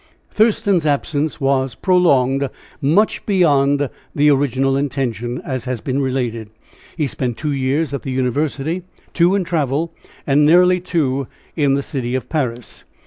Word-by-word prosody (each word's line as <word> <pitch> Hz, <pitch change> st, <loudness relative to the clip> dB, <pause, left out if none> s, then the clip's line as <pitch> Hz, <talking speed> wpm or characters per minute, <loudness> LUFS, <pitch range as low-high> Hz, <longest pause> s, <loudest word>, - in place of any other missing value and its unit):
Thurston's 210 Hz, -5 st, +2 dB
absence 145 Hz, +1 st, -1 dB
was 135 Hz, -2 st, 0 dB
prolonged 140 Hz, -7 st, +2 dB, 0.3 s
much 170 Hz, +10 st, +2 dB
beyond 145 Hz, -7 st, +3 dB, 0.3 s
the 150 Hz, +1 st, +4 dB
original 135 Hz, -1 st, +1 dB
intention, 125 Hz, -4 st, -2 dB
as 130 Hz, -2 st, -3 dB
has 125 Hz, -2 st, -3 dB
been 135 Hz, +4 st, -2 dB
related; 120 Hz, -5 st, -2 dB, 0.5 s
he 155 Hz, -, +1 dB
spent 125 Hz, -2 st, -3 dB
two 150 Hz, -1 st, -2 dB
years 140 Hz, +2 st, 0 dB
at 140 Hz, -, -3 dB
the -, -, -6 dB
university, 140 Hz, +6 st, -1 dB, 0.3 s
two 175 Hz, +2 st, +3 dB
in 200 Hz, -, +1 dB
travel, 165 Hz, -1 st, -1 dB, 0.3 s
and 145 Hz, +1 st, +3 dB
nearly 180 Hz, +4 st, +5 dB
two 140 Hz, -7 st, -1 dB, 0.3 s
in 145 Hz, -4 st, +2 dB
the 140 Hz, -, -1 dB
city 125 Hz, -3 st, -3 dB
of 130 Hz, -, -4 dB
Paris. 125 Hz, -7 st, -3 dB
140 Hz, 140 wpm, -19 LUFS, 130-160 Hz, 0.5 s, nearly